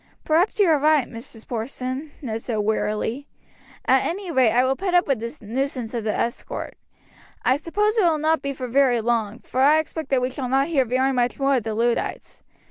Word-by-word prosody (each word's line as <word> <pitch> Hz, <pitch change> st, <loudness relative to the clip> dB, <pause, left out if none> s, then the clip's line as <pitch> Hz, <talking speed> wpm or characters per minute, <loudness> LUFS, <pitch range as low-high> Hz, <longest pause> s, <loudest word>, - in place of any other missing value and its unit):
"Perhaps 335 Hz, +6 st, +2 dB
you 405 Hz, -, +5 dB
are 315 Hz, -3 st, +4 dB
right, 300 Hz, -2 st, +3 dB
Mrs. 230 Hz, -1 st, -10 dB
Porson," 255 Hz, +4 st, -4 dB
Ned 225 Hz, -3 st, -3 dB
said 235 Hz, -, -3 dB
wearily; 220 Hz, +5 st, -1 dB, 0.6 s
"at -, -, +4 dB
any 370 Hz, 0 st, -3 dB
rate 255 Hz, -7 st, +4 dB
I 245 Hz, +1 st, +3 dB
will 265 Hz, +1 st, +1 dB
put 365 Hz, +3 st, -1 dB
up 355 Hz, -, +5 dB
with 270 Hz, -5 st, 0 dB
the 235 Hz, +1 st, -7 dB
nuisance 250 Hz, 0 st, -3 dB
of 230 Hz, -3 st, -3 dB
this 215 Hz, -, 0 dB
escort. 235 Hz, -, -4 dB, 0.7 s
I 255 Hz, -, +4 dB
suppose 415 Hz, -, 0 dB
it -, -, +4 dB
will 330 Hz, -3 st, +3 dB
not 315 Hz, 0 st, +1 dB
be 280 Hz, -, -3 dB
for 260 Hz, -2 st, -5 dB
very 250 Hz, -1 st, +3 dB
long, 225 Hz, -1 st, -1 dB
for 260 Hz, -, -2 dB
I 295 Hz, +3 st, +6 dB
expect 315 Hz, -1 st, -3 dB
that 270 Hz, -, +3 dB
we 255 Hz, -, -1 dB
shall 255 Hz, -1 st, -4 dB
not 270 Hz, +4 st, +2 dB
hear 275 Hz, -6 st, +2 dB
very 260 Hz, +3 st, +1 dB
much 245 Hz, -1 st, 0 dB
more 275 Hz, 0 st, +3 dB
of 240 Hz, -, -2 dB
the 220 Hz, -1 st, -2 dB
Luddites. 235 Hz, +1 st, -2 dB
260 Hz, 210 wpm, -23 LUFS, 235-305 Hz, 0.7 s, I